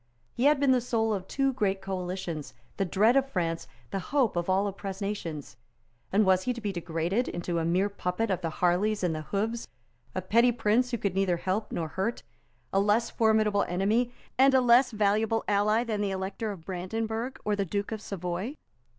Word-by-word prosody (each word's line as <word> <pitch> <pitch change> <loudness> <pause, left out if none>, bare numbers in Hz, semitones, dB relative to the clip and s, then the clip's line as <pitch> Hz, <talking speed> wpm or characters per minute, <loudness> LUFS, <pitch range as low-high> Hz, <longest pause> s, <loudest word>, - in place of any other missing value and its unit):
He 245 - 0
had 295 -1 +5
been 280 -2 +4
the 255 -1 +4
soul 225 -2 0
of 190 -2 -4
two 270 -1 +1
great 200 -6 0
coalitions, 185 -4 -4 0.2
the 195 - +1
dread 215 +7 +3
of 270 0 +3
France, 165 -7 -2 0.2
the 195 - -1
hope 255 +2 +1
of 175 +1 -1
all 190 +2 +3
oppressed 195 -1 -5
nations. 165 -10 -5 0.5
And 205 +2 +4
was 185 -1 +4
he 250 - +1
to 235 - -7
be 210 -3 -2
degraded 175 +5 -1
into 175 0 -2
a 165 - -1
mere 180 +4 +2
puppet 200 +2 -2
of 185 - -1
the 165 - -1
Harleys 185 +6 +1
and 175 -2 +1
the 155 - -3
Hooves, 215 +8 -2 0.5
a 185 - -1
petty 235 +6 +4
prince 225 +2 +2
who 240 - -1
could 200 -3 -1
neither 190 -2 +1
help 190 +5 -2
nor 165 -2 -2
hurt, 195 +8 -2 0.5
a 195 - +4
less 210 +4 +2
formidable 215 -2 +3
enemy 210 +7 +1 0.3
and 270 0 +6
less 250 0 +5
valuable 215 +1 +1
ally 210 +3 +3
than 220 -3 -2
the 205 - 0
Elector 195 +3 -3
of 175 -5 -10
Brandenburg 220 +7 -3
or 210 - +1
the 200 - 0
Duke 200 +3 -3
of 220 -1 -4
Savoy? 190 - -4
205 Hz, 195 wpm, -28 LUFS, 185-225 Hz, 0.5 s, and